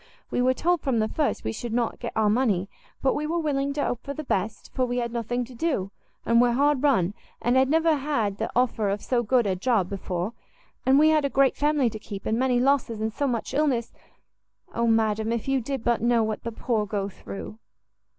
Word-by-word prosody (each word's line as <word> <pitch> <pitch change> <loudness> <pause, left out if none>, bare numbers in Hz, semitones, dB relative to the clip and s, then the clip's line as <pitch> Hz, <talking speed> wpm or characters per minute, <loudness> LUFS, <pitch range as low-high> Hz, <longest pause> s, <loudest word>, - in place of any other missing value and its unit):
We - - +1
were 255 +1 +3
told 350 +3 +1
from 265 -4 0
the 215 -1 +2
first 300 +5 -1
we 110 - -2
should 235 - -5
not 235 -1 -1
get - - -5
our 220 -1 +2
money; 210 -4 +2 0.4
but 265 - +3
we 300 +1 -2
were 335 +2 -1
willing 280 -4 0
to 285 0 -1
hope 240 - -2
for 280 - -5
the 310 - -5
best, 210 -4 -2
for 260 - 0
we 245 0 -1
had 235 -1 -2
nothing 240 +1 -2
to 255 - -13
do, 235 - -1 0.3
and 235 0 +4
were 245 -1 +3
hard 285 +1 +2
run, 210 -11 +2 0.3
and 240 +1 +1
had 260 0 +4
never 320 0 +3
had 235 -9 -1
the - - -1
offer 230 -4 +1
of 200 +1 -2
so 245 -2 +1
good 240 +1 +2
a 190 -2 +1
job 195 -2 +1
before; 185 +1 -3 0.5
and 265 +1 +6
we 310 +2 +6
had 310 -1 +3
a 280 - +1
great 275 -1 +3
family 295 -3 +2
to 215 - -7
keep, 200 -2 -8
and 225 +2 0
many 255 -1 +2
losses, 255 -4 +1
and 220 0 -2
so 285 - -1
much 240 -1 -2
illness! 270 -5 0 0.8
Oh 235 0 0
madam! 220 -1 +2
if 235 +1 -2
you 270 -1 +1
did 265 0 -4
but 235 -2 +1
know 235 -1 +3
what 215 -1 -2
the 230 - -3
poor 220 -2 -1
go 200 -1 -2
through!" 200 +2 -9
240 Hz, 230 wpm, -25 LUFS, 220-275 Hz, 0.8 s, and